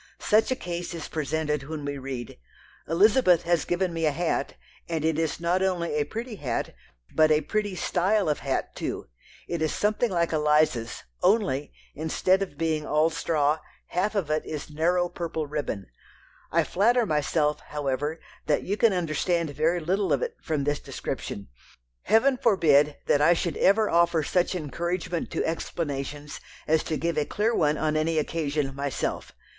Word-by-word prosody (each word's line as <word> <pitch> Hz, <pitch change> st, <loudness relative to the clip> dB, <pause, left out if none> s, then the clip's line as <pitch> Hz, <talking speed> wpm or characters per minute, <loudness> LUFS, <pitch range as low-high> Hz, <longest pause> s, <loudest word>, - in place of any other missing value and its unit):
Such 215 Hz, +1 st, +3 dB
a 255 Hz, -, +1 dB
case 175 Hz, -4 st, -5 dB
is 160 Hz, -, -6 dB
presented 150 Hz, -2 st, -2 dB
when 155 Hz, -2 st, -5 dB
we 140 Hz, -1 st, -3 dB
read: 130 Hz, -, -6 dB, 0.5 s
"Elizabeth 185 Hz, 0 st, +4 dB
has 170 Hz, -2 st, +1 dB
given 175 Hz, 0 st, 0 dB
me 165 Hz, -1 st, 0 dB
a -, -, +3 dB
hat, 170 Hz, +3 st, -1 dB, 0.3 s
and 160 Hz, -2 st, -1 dB
it 160 Hz, -1 st, +1 dB
is 165 Hz, -1 st, -1 dB
not 175 Hz, +2 st, +1 dB
only 180 Hz, -4 st, 0 dB
a 150 Hz, -1 st, +1 dB
pretty 230 Hz, -, -6 dB
hat, 125 Hz, -8 st, -3 dB, 0.4 s
but 155 Hz, 0 st, +5 dB
a 155 Hz, 0 st, +4 dB
pretty 205 Hz, +4 st, -2 dB
style 190 Hz, +3 st, +1 dB
of 150 Hz, -, 0 dB
hat 135 Hz, -1 st, -2 dB
too. -, -, -4 dB, 0.4 s
It 170 Hz, -2 st, -3 dB
is 155 Hz, -, +1 dB
something 215 Hz, +3 st, +1 dB
like 170 Hz, -3 st, 0 dB
Eliza's, 150 Hz, -6 st, +2 dB, 0.2 s
only, 185 Hz, -9 st, +2 dB, 0.2 s
instead 185 Hz, +5 st, +1 dB
of 180 Hz, -7 st, -4 dB
being 160 Hz, -1 st, 0 dB
all 155 Hz, +2 st, +2 dB
straw, 155 Hz, -1 st, +1 dB, 0.3 s
half 205 Hz, +5 st, 0 dB
of 175 Hz, -7 st, -1 dB
it 155 Hz, -, +1 dB
is 150 Hz, 0 st, -6 dB
narrow 175 Hz, +4 st, +2 dB
purple 170 Hz, -3 st, -4 dB
ribbon. 145 Hz, -9 st, -3 dB, 0.7 s
I -, -, +3 dB
flatter 235 Hz, +5 st, +2 dB
myself, 150 Hz, -2 st, +1 dB
however, 145 Hz, +2 st, -3 dB, 0.3 s
that 150 Hz, -, +2 dB
you 200 Hz, +2 st, -2 dB
can 225 Hz, -3 st, +4 dB
understand 170 Hz, -1 st, 0 dB
very 160 Hz, +5 st, +1 dB
little 190 Hz, +5 st, 0 dB
of -, -, +2 dB
it 475 Hz, -1 st, -3 dB
from 155 Hz, -4 st, -1 dB
this 145 Hz, +1 st, 0 dB
description. 100 Hz, -, -5 dB, 0.6 s
Heaven 255 Hz, +4 st, +4 dB
forbid 150 Hz, -, +4 dB
that 145 Hz, -, +3 dB
I 160 Hz, +4 st, +6 dB
should 170 Hz, -2 st, -2 dB
ever 215 Hz, +2 st, +4 dB
offer 170 Hz, -2 st, +3 dB
such 180 Hz, +4 st, +1 dB
encouragement 170 Hz, +2 st, -3 dB
to -, -, -1 dB
explanations 145 Hz, -3 st, -4 dB, 0.3 s
as 160 Hz, +1 st, +3 dB
to 155 Hz, -, -1 dB
give 170 Hz, -1 st, 0 dB
a 150 Hz, -, 0 dB
clear 215 Hz, +8 st, 0 dB
one 150 Hz, -6 st, +2 dB
on 155 Hz, 0 st, 0 dB
any 160 Hz, +1 st, +1 dB
occasion 150 Hz, -3 st, -1 dB
myself! 140 Hz, -1 st, -3 dB
160 Hz, 170 wpm, -26 LUFS, 150-180 Hz, 0.7 s, I